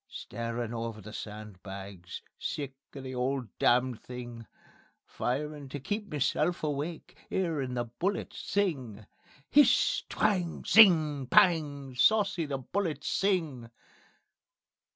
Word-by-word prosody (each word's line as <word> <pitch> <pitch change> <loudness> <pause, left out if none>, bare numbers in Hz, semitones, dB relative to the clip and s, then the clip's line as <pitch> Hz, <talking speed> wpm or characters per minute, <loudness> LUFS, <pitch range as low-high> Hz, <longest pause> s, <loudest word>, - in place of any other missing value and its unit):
Starin' 115 0 -4
over 115 -1 -4
the 110 +1 -10
sandbags, 100 -4 -8 0.2
Sick 145 -4 -3 0.2
of 135 - -7
the 130 0 -6
'ole 130 +1 -1
damn 125 +1 +4
thing; 120 -1 -9 0.6
Firin' 145 +2 -3
to 145 - -5
keep 205 +10 -3
meself 155 +3 0
awake, 150 +2 -3
'Earin' 150 -9 -1
the 120 - 0
bullets 175 - -3
sing. 130 - -2 0.5
_(HISS! 290 0 +5
TWANG! 185 -6 0
TSING! 155 - +6
PANG! 145 -5 +3
SAUCY 200 - +3
THE 140 -1 -2
BULLETS 150 +2 -3
SING.) 160 - 0
135 Hz, 110 wpm, -30 LUFS, 120-170 Hz, 0.6 s, TSING